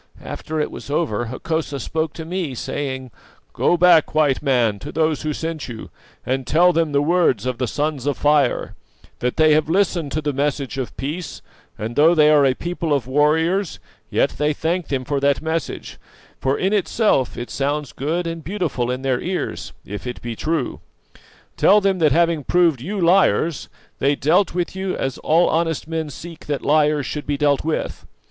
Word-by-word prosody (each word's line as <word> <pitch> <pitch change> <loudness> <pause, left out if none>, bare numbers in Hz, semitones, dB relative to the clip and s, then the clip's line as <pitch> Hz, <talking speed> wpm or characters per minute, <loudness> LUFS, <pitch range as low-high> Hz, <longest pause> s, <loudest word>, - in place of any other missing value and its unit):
After 155 0 -5
it 150 - -1
was - - -9
over, 140 -7 0
Hokosa 145 +4 -3
spoke 160 +4 -2
to 160 - -7
me, 170 -5 -3
saying: 130 0 -4 0.4
"'Go 175 - +2
back, 170 -3 +5
White 150 -4 +3
Man, 120 -7 +1
to - - -7
those 155 -1 0
who 155 - -2
sent 160 0 -4
you, 115 -2 -8 0.3
and 130 0 -2
tell 175 +4 +4
them 165 -2 +1
the 140 0 +2
words 160 - +2
of 130 -2 -2
the 125 - 0
Sons 145 0 -2
of 145 - 0
Fire: 145 -3 +2 0.5
That 125 0 -2
they 155 -1 +5
have 155 0 +2
listened 175 -5 +1
to 155 - 0
the 145 -1 -1
message 140 -1 -2
of 130 - -5
peace, 155 +6 -5 0.3
and 110 +3 -5
though 160 +4 +5
they 150 -1 +5
are 145 -2 +5
a 130 - +1
people 170 0 -3
of 135 -5 -2
warriors, 160 +7 +1 0.3
yet - - +2
they 150 +1 +2
thank 165 +3 -2
them 130 -2 -2
for 145 0 -1
that 140 0 +2
message, 160 0 -4 0.4
for 135 +1 0
in 190 +2 0
itself 210 - +1
it 120 - -6
sounds 140 -2 -2
good 165 +6 -2
and 165 -1 -5
beautiful 160 -9 -2
in 130 +1 -3
their 130 -2 0
ears, 180 0 -3
if 105 +5 -7
it 125 - -5
be 120 -1 -4
true. 155 0 -2 0.8
Tell 210 - +6
them 195 -2 +1
that 155 -3 +4
having 165 0 +2
proved 165 -5 +2
you 200 +8 -4
liars, 170 - +2 0.3
they 140 +1 +2
dealt 165 +7 +2
with 180 0 -2
you 190 0 -3
as 135 -1 -3
all 165 +3 +3
honest 165 -2 0
men 160 -1 -3
seek 165 +3 -10
that 145 -2 -2
liars 150 -1 +3
should 150 - -5
be 145 -1 0
dealt 145 -1 +2
with. 160 0 -3
150 Hz, 190 wpm, -21 LUFS, 135-165 Hz, 0.8 s, Tell